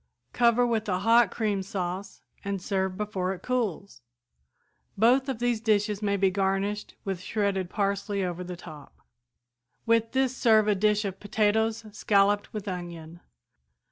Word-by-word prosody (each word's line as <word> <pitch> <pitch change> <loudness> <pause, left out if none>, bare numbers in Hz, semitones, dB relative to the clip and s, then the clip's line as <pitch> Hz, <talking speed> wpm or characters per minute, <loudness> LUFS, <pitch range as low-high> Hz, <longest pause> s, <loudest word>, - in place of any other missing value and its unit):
Cover 240 0 +4
with 225 -3 -1
a 180 - +1
hot 230 +5 +4
cream 210 -4 -1
sauce 190 0 -5 0.2
and 200 -1 -2
serve 190 0 -2
before 195 -3 -2
it 180 - -16
cools. 205 - -2 1.0
Both 255 +6 +4
of 260 - -2
these 240 -1 0
dishes 210 -2 +1
may 200 -1 0
be 195 -1 +2
garnished 195 +2 -1
with 190 -3 -3
shredded 195 -3 -1
parsley 200 -1 -1
over 180 0 -4
the 180 0 -6
top. 150 -4 -12 0.9
"With 230 0 +2
this 260 -1 +1
serve 220 -4 +4
a 210 - +4
dish 210 +1 +1
of 195 -1 -4
potatoes 220 +2 0
scalloped 205 0 +2
with 210 -2 -6
onion. 170 -3 -6
205 Hz, 145 wpm, -27 LUFS, 190-220 Hz, 1.0 s, Cover